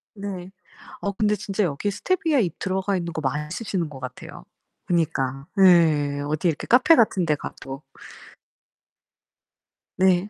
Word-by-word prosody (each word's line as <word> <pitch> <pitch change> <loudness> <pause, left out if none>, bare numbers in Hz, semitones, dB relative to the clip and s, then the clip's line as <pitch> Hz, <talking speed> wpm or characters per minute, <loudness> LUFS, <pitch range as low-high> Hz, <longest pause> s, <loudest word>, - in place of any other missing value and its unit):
네. 190 -2 -6 0.5
어 200 -3 -2
근데 210 +1 +1
진짜 200 0 -1
여기 170 +6 -1
스테비아 320 - 0
잎 175 -5 -2
들어가있는거 185 -4 -2
많이 150 +2 -2
쓰시는거 170 - -3
같아요. 125 - -9 0.4
그니까. 140 -5 -1 0.2
예 150 -5 +4
어디 155 +4 0
이렇게 155 - -2
카페 260 +7 +6
같은데 180 -8 +3
가도. 135 0 -8 2.2
네. 185 +1 +3
175 Hz, 260 characters per minute, -24 LUFS, 150-200 Hz, 2.2 s, 카페